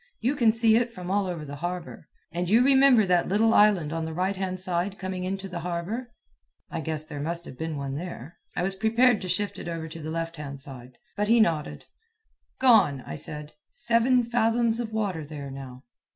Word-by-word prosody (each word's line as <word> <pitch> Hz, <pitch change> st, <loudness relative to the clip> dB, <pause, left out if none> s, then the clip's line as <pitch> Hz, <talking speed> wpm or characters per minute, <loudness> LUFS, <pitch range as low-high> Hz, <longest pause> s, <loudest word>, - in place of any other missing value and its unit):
"You 255 Hz, +6 st, 0 dB
can 230 Hz, -5 st, +4 dB
see 225 Hz, 0 st, +4 dB
it 240 Hz, 0 st, 0 dB
from 185 Hz, -5 st, -6 dB
all 200 Hz, -1 st, +1 dB
over 170 Hz, -4 st, -4 dB
the 145 Hz, 0 st, -7 dB
harbor. 175 Hz, +2 st, -5 dB, 0.2 s
And 175 Hz, +1 st, -2 dB
you 230 Hz, +4 st, +5 dB
remember 265 Hz, -5 st, +6 dB
that 180 Hz, -2 st, +2 dB
little 220 Hz, +4 st, +3 dB
island 190 Hz, -8 st, +4 dB
on 165 Hz, 0 st, -2 dB
the 160 Hz, 0 st, -5 dB
right 185 Hz, +3 st, 0 dB
hand 185 Hz, -1 st, -3 dB
side 185 Hz, +1 st, -2 dB
coming 185 Hz, -1 st, -4 dB
into 195 Hz, +1 st, -3 dB
the 180 Hz, -2 st, -5 dB
harbor?" 180 Hz, +9 st, -4 dB, 0.6 s
I 165 Hz, -, -3 dB
guess 155 Hz, 0 st, -3 dB
there 150 Hz, -2 st, -7 dB
must 170 Hz, +3 st, -3 dB
have -, -, -9 dB
been 160 Hz, +1 st, -4 dB
one 140 Hz, -1 st, -4 dB
there 160 Hz, -1 st, -7 dB, 0.2 s
(I -, -, 0 dB
was 190 Hz, +1 st, 0 dB
prepared 225 Hz, +3 st, +3 dB
to 185 Hz, -, -5 dB
shift 200 Hz, +3 st, -1 dB
it -, -, -7 dB
over 165 Hz, -1 st, -4 dB
to 165 Hz, +1 st, -9 dB
the 155 Hz, -, -5 dB
left 165 Hz, 0 st, -3 dB
hand 140 Hz, -2 st, -7 dB
side), 130 Hz, -2 st, -11 dB, 0.2 s
for 210 Hz, -, 0 dB
he 230 Hz, +3 st, +4 dB
nodded. 165 Hz, -9 st, 0 dB, 0.7 s
"Gone," 210 Hz, -, +5 dB
I 75 Hz, -, -6 dB
said. 150 Hz, -, -5 dB, 0.2 s
"Seven 245 Hz, -, +2 dB
fathoms 230 Hz, 0 st, +1 dB
of 230 Hz, -2 st, -3 dB
water 200 Hz, -7 st, -2 dB
there 145 Hz, -2 st, -7 dB
now." 130 Hz, -1 st, -9 dB
180 Hz, 210 wpm, -26 LUFS, 160-220 Hz, 0.7 s, remember